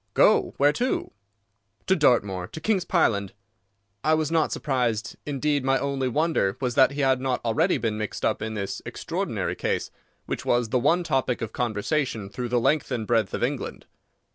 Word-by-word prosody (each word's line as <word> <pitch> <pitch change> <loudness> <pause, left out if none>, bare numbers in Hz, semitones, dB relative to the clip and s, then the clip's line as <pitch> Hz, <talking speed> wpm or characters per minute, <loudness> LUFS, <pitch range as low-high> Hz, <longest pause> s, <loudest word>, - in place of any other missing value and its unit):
"Go! - - +4
Where 145 +1 +4
to?" 250 +8 -1 0.7
"To 190 - +3
Dartmoor; 100 - +2
to 160 - -8
King's 190 0 0
Pyland." 100 - +1 0.7
I 155 +1 +4
was 155 0 -1
not 160 -2 +2
surprised. 120 -5 -1
Indeed, 145 0 0
my 135 0 +3
only 140 -1 -1
wonder 145 -8 +1
was 125 -2 -1
that 135 +1 +5
he 145 - -2
had 130 -2 +2
not 130 -1 0
already 160 +11 +2
been 110 -2 -2
mixed 105 -2 -3
up - - 0
in 110 0 -3
this 100 -2 -4
extraordinary - - -3
case, - - -2 0.3
which - - -4
was 120 -2 +1
the 125 - +2
one 165 +8 +2
topic 130 -7 0
of 110 - -5
conversation 115 -1 -1
through 120 +4 -4
the 120 0 +2
length 140 +4 +1
and 115 -4 -2
breadth 110 -3 +1
of - - -3
England. - - -3
130 Hz, 180 wpm, -25 LUFS, 115-150 Hz, 0.7 s, that